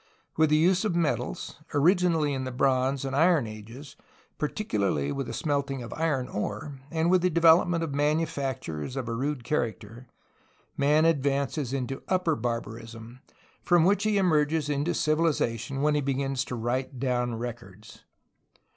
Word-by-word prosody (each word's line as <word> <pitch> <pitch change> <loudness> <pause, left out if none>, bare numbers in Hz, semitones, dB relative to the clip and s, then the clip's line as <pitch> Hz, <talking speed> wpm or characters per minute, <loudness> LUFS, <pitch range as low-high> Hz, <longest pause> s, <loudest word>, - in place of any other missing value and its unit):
With 160 -1 +3
the 150 - +4
use 180 +5 +3
of 210 -6 0
metals, 155 - -2 0.2
originally 165 -1 +3
in 130 -1 -2
the 130 - -4
bronze 130 +1 +1
and 135 0 -3
iron 160 -3 +4
ages, 115 +6 -10 0.4
particularly 100 - -1
with 135 -2 -3
the - - -5
smelting 140 +1 -2
of 115 - -7
iron 150 -6 -1
ore, 110 +6 -5
and 165 +2 +1
with 185 -1 +4
the 180 - +2
development 170 0 +4
of 155 -4 -3
manufactures 140 - -2
of 130 -3 -3
a 115 - -2
rude 135 +2 -2
character, 115 -2 -3 0.7
man 150 +3 +3
advances 140 -3 0
into 135 0 -3
upper 180 -4 +1
barbarism., 115 0 -6 0.4
from 175 -2 +4
which 200 +4 +3
he 215 -1 +2
emerges 155 -4 +2
into 145 +4 0
civilization 140 -5 0
when 150 0 +3
he 150 - +1
begins 135 -1 -1
to 125 - -5
write 125 +3 -2
down 125 -2 0
records. 110 -3 -8
140 Hz, 150 wpm, -27 LUFS, 120-160 Hz, 0.7 s, the